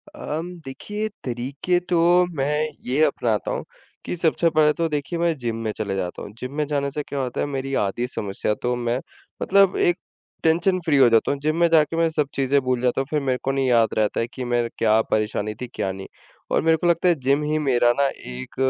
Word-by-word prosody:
अम, 175 - -5
देखिए 210 +11 -4 0.2
तरीके 135 +8 -1
तो 175 - +2 0.4
मैं 135 -1 0 0.4
ये 135 +5 +2
अपनाता 120 -8 0
हूँ, - - -3 0.4
कि - - -3
सबसे 165 0 +2
पहले 155 -1 +4
तो 165 +1 0
देखिए 150 +3 -3
मैं 170 -2 +1
जिम 120 -3 -3
में 110 - -1
चले 100 -3 -2
जाता 90 -2 -4
हूँ। 105 - -8
जिम 130 +2 -6
में 150 - +1
जाने 140 -1 -1
से 150 +1 -3
क्या 140 - -4
होता 125 -2 -4
है, - - +1
मेरी 135 -1 -4
आधी 105 +5 -1
समस्या 105 -3 -2
तो 125 0 0
मैं 120 0 -1 0.4
मतलब 195 -1 +4
एक 175 0 +2 0.5
टेंशन-फ्री 165 -1 +2
हो 130 -3 +7
जाता 115 -1 +3
हूँ। 140 - -2
जिम 155 +3 0
में 170 - +5
जाके 160 -1 +3
मैं 165 0 +3
सब 150 -3 0
चीज़ें 140 +1 +2
भूल 125 -2 -1
जाता 125 +1 +1
हूँ, - - -3
फिर 155 - +1
मेरे 130 -2 0
को 135 - 0
नहीं 135 -1 0
याद 115 -3 +4
रहता 110 -1 +1
है, 115 - 0
कि 130 +1 -7
मैं 120 -1 0
क्या 110 0 +4
परेशानी 110 0 0
थी, 125 - -3
क्या 95 - -1
नहीं? 95 0 -8 0.4
और - - +3
मेरे 160 0 +3
को 175 - -1
लगता 170 +1 +3
है, 175 - +4
जिम 140 +1 +1
ही 150 +1 0
मेरा 120 -1 +4
ना 140 - +4 0.2
एक 65 +1 -8
135 Hz, 225 wpm, -23 LUFS, 120-160 Hz, 0.5 s, हो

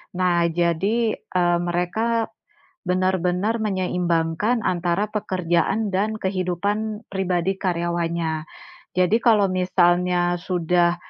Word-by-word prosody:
Nah 180 -1 +2
jadi, 170 +6 +1 0.2
eee, 175 -1 +1
mereka 220 +7 -1 0.6
benar-benar 185 +4 +1
menyeimbangkan 180 +1 0
antara 180 +4 0
pekerjaan 190 +1 0
dan 205 +3 0
kehidupan 200 +3 -2
pribadi 190 0 -1
karyawannya. 170 -3 -1 0.5
Jadi, 185 +4 +3
kalau 215 -4 +4
misalnya 180 -1 +2
sudah 175 -1 +1
180 Hz, 85 wpm, -23 LUFS, 175-200 Hz, 0.6 s, kalau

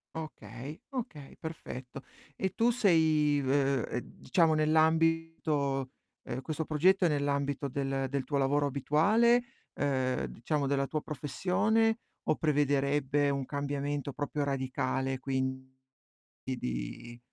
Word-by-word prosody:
Okay, 140 -2 -7
okay, 175 - -6
perfetto. 135 -5 -7 0.3
E 190 +4 -2
tu 235 +1 +3
sei, 160 -9 +3
v 135 -1 +2
uhm, 125 - -6
diciamo, 165 -4 +5
nell' 155 +1 +2
ambito 160 -4 +2 0.3
ehm, 130 0 -4
questo 160 +1 -3
progetto 180 +5 +3
è - - +6
nell'ambito 140 -1 0
del 135 0 -1
del 140 0 -1
tuo 140 +2 -1
lavoro 140 +1 +2
abituale, 205 - +3 0.3
ehm, 130 -3 0
diciamo, 145 +5 -2
della 140 0 +1
tua 155 +1 -2
professione 220 - +1 0.2
o 155 - +2
prevederebbe 145 -1 +2
un 140 -1 -1
cambiamento 145 0 -2
proprio 145 +1 -2
radicale, 130 -1 -1
quindi 130 0 -2 0.8
di 120 - -5
145 Hz, 120 wpm, -31 LUFS, 135-160 Hz, 0.8 s, è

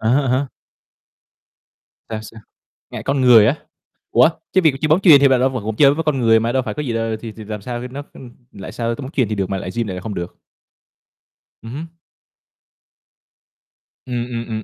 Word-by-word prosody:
À 110 - -1
há, 135 +2 +2
à 125 0 +2
há. 140 - -7 1.6
Sao, 110 -1 -4
sao? 110 0 -12 0.5
Ngại - - -7
con 140 0 0
người 120 -4 +7
á? 130 - +2 0.6
Ủa? - - +5 0.2
Chứ 190 - +4
việc 160 -5 +4
chơi 155 - +1
bóng 155 +3 +4
chuyền 165 -7 +7
thì 140 - +6
bạn 130 -2 +3
v - - +2
vẫn 115 -5 -4
vẫn 110 0 -3
chơi 140 +3 +5
với 165 +2 -3
con 150 -3 0
người 115 -2 +4
mà 115 +1 -1
đâu 130 +1 +1
phải 110 -4 -5
có 150 - -4
gì 125 -5 -3
đâu, 115 -1 -1
thì 115 - -7
thì 110 +1 -11
làm 105 -1 -6
sao 120 +3 -5
nó, 140 +3 -7
ưm, 125 -2 -12 0.2
lại 95 - -9
sao 115 -1 -2
tới - - -9
bóng 130 - -7
chuyền 130 -7 +1
thì 105 - -2
được 95 -2 -2
mà 95 - -2
lại 95 - -6
gym 115 -2 -1
lại 95 - -4
là 90 - -6
không 105 +2 -5
được? 85 -1 -6 1.3
Ừm 115 - -9
hứm. 155 +5 -6 2.2
Ừm, 120 -2 -3
ừm, 115 -1 -5
ừm. 110 -1 -4
120 Hz, 230 wpm, -19 LUFS, 110-135 Hz, 2.2 s, người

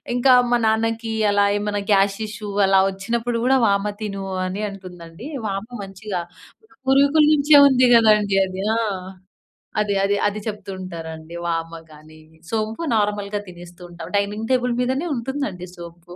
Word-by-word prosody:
ఇంకా 255 +1 +5 0.2
మా 240 - +3
నాన్నకి 225 +1 0 0.2
అలా 205 0 +3
ఏమన్నా 205 0 -2
గ్యాస్ 195 0 +3
ఇష్యూ 210 0 -7 0.2
అలా 195 0 +4
ఒచ్చినప్పుడు 230 +4 -2
గూడా 265 +1 +4
"వామ 200 0 +1 0.2
తిను" 195 -2 -4 0.2
అని 190 +3 -4
అంటుందండి. 180 +1 -11 0.2
వామ 195 +1 -3 0.2
మంచిగా 195 -1 -5 0.7
పూర్వీకులు 280 +3 +4
నుంచే 295 0 +4
ఉంది 255 -2 +4
గదండీ 210 -3 +4
అది. 185 0 -6 0.2
ఆ! - - +1 1.0
అది, 205 -1 -1
అది, 200 +1 +2
అది 205 +1 -3
చెప్తూ 210 -1 -6
ఉంటారండి. 165 -2 -8
వామ 165 0 -3 0.2
గాని 155 +1 -16 0.3
సోంపు 220 +6 -2
నార్మల్‌గా 205 0 -1
తినేస్తూ 175 0 -13
ఉంటాం. 165 -1 -9
డైనింగ్ 210 +3 -2
టేబుల్ 250 -1 +1
మీదనే 265 +7 -1
ఉంటుందండి 230 -8 -4
సోంపు. 170 0 -11
205 Hz, 140 wpm, -21 LUFS, 185-230 Hz, 1.0 s, ఇంకా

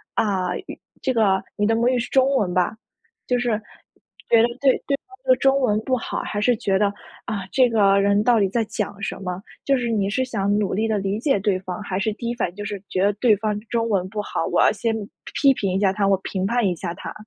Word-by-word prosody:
啊 185 -4 0
语， - - -8 0.2
这 260 - +1
个 200 -4 +2
你 205 0 +2
的 225 - +2
母 235 +2 +2
语 250 -1 +2
是 240 - -4
中 270 +1 +3
文 185 -6 0
吧， 180 +4 +1 0.5
就 250 - +2
是 245 0 0 0.8
觉 230 -1 +6
得 235 - +4
对 270 -2 +6 0.2
对 280 - +2
方 390 - -16
的 - - +5
中 270 0 +3
文 215 -4 +2
不 255 +2 0
好。 - - -4
还 205 - -3
是 245 +2 +3
觉 195 -2 0
得， 205 - +3 0.4
啊， 205 -5 -3
这 255 -2 +4
个 200 -3 +4
人 200 +1 +3
到 235 -2 +4
底 195 - +3
在 230 +2 0
讲 200 -1 -4
什 - - -3
么？ 180 0 -4 0.2
就 275 -1 +3
是 240 -1 -2
你 200 -3 0
是 260 +5 0
想 205 -5 -1
努 205 -3 0
力 220 +3 0
地 215 -1 0
理 195 +2 -2
解 270 -4 +2
对 195 -2 0
方， 185 +2 -6
还 190 -1 -3
是 215 +1 0
第 235 +2 -5
一 - - -1
反 220 - -1
应 175 - -17
就 205 - -6
是 200 -2 -5
觉 185 - 0
得 205 - +4
对 215 +1 +3
方 210 0 -2
中 230 -1 0
文 185 -3 0
不 210 0 -3
好， 165 - -3
我 - - +2
要 - - +5
先， 225 +2 -1 0.5
批 275 -2 +6
评 195 -6 -2
一 - - +1
下 190 -2 +4
他， 200 -1 +1
我 195 -1 +4
评 190 -1 -2
判 235 +1 +1
一 180 - +1
下 170 +1 -5
他？ - - -8
210 Hz, 280 characters per minute, -22 LUFS, 195-240 Hz, 0.8 s, 觉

